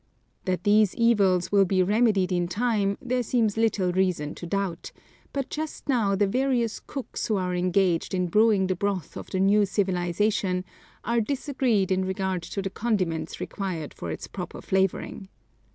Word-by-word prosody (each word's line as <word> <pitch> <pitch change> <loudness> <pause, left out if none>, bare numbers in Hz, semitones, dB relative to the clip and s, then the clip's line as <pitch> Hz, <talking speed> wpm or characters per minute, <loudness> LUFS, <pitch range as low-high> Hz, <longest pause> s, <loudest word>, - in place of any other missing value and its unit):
That 185 -1 -1
these 210 -1 +4
evils 200 -7 +3
will 200 -1 +5
be 185 0 +2
remedied 205 -2 +2
in 175 -1 +1
time, 200 +1 0
there 250 0 -1
seems 225 -3 +1
little 215 -5 +1
reason 180 -5 0
to 175 - -8
doubt, 190 -2 -3 0.4
but 275 -2 -3
just 310 -1 -5
now 225 -8 +2
the 205 +1 +3
various 245 +1 0
cooks 270 -3 -5
who 215 - +1
are 180 -1 -1
engaged 180 0 +1
in 180 -1 +1
brewing 210 +2 +3
the 185 0 0
broth 195 -1 -2
of - - -8
the 185 - -2
new 200 +2 +4
civilization 185 0 0 0.4
are 235 +1 +1
disagreed 255 -6 0
in 190 0 +2
regard 190 -1 -2
to 195 +4 -5
the 195 - -3
condiments 185 -9 -1
required 180 -7 -4
for 85 - -6
its 80 - -5
proper - - -7
flavoring. 190 +1 -1
195 Hz, 165 wpm, -26 LUFS, 185-220 Hz, 0.4 s, will